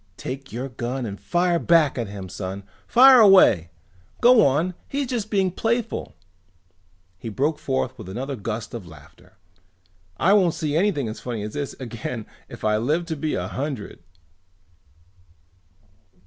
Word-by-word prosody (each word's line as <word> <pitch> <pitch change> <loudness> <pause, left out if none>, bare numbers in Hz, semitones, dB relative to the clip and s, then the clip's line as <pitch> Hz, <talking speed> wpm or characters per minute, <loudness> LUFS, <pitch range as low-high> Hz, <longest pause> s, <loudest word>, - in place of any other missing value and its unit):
"Take 135 +1 -7
your 125 +4 -4
gun 125 0 -4
and 100 -2 -7
fire 175 0 +1
back 165 -5 +3
at 120 -4 -3
him, 100 -2 -8
son. 95 +1 -6 0.2
Fire 255 +1 +8
away! 190 - +6 0.5
Go 240 -2 +6
on, 155 +7 +1
he's 280 0 -2
just 235 -4 -3
being 195 -3 +1
playful!" 230 +4 -2 1.0
He 115 - -6
broke 145 +9 -1
forth 130 -1 -2
with 90 - -9
another 135 +8 -4
gust 110 +1 -5
of 110 -7 -7
laughter. 75 +3 -17 0.8
"I 190 - +3
won't 185 -5 +3
see 150 -2 -2
anything 165 - +1
as 110 - -6
funny 115 -4 -5
as 105 - -6
this 145 -2 -4
again 115 -2 -6 0.2
if - - -11
I 105 0 +2
live 150 +10 0
to 165 -1 -4
be 155 +1 -2
a - - -3
hundred!" 135 -5 -5
135 Hz, 150 wpm, -23 LUFS, 110-180 Hz, 1.0 s, Fire